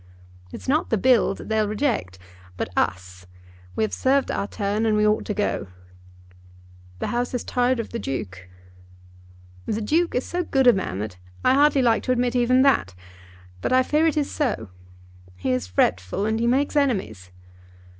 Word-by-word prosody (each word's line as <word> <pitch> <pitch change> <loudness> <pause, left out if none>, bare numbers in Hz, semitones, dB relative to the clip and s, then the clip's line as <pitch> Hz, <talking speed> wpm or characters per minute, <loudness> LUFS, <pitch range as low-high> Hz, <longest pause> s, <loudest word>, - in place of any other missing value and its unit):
"It's - - -9
not 300 +4 +1
the 225 - +2
Bill 240 -2 +3
that - - -10
they'll 220 -1 +1
reject, 215 - -1 0.4
but - - -3
us. 90 +1 -2 0.5
We 110 - 0
have 105 -3 -2
served 270 - +1
our 200 - -2
turn, 205 +2 -2
and 215 -1 +2
we 210 - +3
ought 210 0 +1
to 210 - -3
go." 205 - -1 1.3
"The - - -3
House 245 +1 -2
is 245 - -2
tired 250 0 0
of 230 - -4
the 235 - -5
Duke?" 95 - -6 1.2
"The 215 - -1
Duke 325 +10 0
is 250 - 0
so 355 0 -2
good 270 -5 +1
a 245 - +8
man 185 - -3
that 100 -2 -5 0.3
I 255 - +5
hardly 285 -1 +4
like 230 -2 +3
to 255 - +1
admit 245 0 0
even 250 +1 +4
that; 270 - +2 0.7
but - - -2
I 255 0 +5
fear 305 +5 +2
it 315 - 0
is 290 -2 0
so. 220 - -2 0.7
He 90 +8 -2
is 125 -8 -1
fretful 90 - 0
and 220 +1 0
he 235 - +1
makes 275 +5 +1
enemies." 190 - -1
225 Hz, 180 wpm, -23 LUFS, -, 1.3 s, a